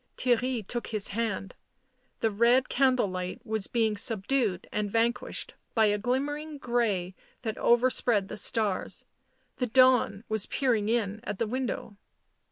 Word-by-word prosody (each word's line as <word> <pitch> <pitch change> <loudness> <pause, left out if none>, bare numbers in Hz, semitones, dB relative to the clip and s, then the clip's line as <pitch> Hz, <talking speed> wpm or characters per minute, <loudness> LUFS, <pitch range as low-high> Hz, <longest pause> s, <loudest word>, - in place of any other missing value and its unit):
Theirry 245 -3 0
took 240 -1 -4
his 215 -3 -1
hand; 200 -3 -3 0.7
the 225 - +2
red 235 +5 +3
candle 260 -2 +3
light 185 -1 -4
was 220 -2 -1
being 225 -3 +1
subdued 210 -2 +1
and 210 -1 -1
vanquished 230 +3 -1 0.2
by 220 -2 +5
a 205 0 +2
glimmering 290 +6 -2
grey 225 -8 0 0.3
that 220 -2 -3
overspread 240 -4 +3
the - - -6
stars; 210 -2 -2 0.5
the 250 - -1
dawn 250 -4 +4
was 220 -2 0
peering 230 -6 0
in 220 -3 0
at 205 - -4
the 230 - 0
window. 235 -3 -4
225 Hz, 140 wpm, -28 LUFS, 205-250 Hz, 0.7 s, by